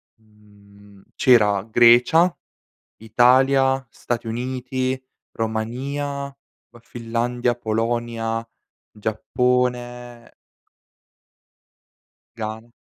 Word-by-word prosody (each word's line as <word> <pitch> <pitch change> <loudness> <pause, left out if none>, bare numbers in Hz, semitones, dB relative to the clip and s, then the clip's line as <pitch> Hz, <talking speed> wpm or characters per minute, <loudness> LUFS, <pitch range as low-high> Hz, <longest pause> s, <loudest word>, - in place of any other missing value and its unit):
mhmm, 105 -2 -21
c'era 105 -6 +4
Grecia, 120 +10 +5 0.6
Italia, 130 +4 +3
Stati 120 -1 -4
Uniti, 130 +2 -3 0.3
Romania, 135 +6 -4 0.3
poi 120 - -18
Finlandia, 120 +1 -2
Polonia, 115 0 -2 0.4
Giappone 120 +2 -2 2.0
Ghana. 110 +1 -6
120 Hz, 55 wpm, -22 LUFS, 110-125 Hz, 2.0 s, Grecia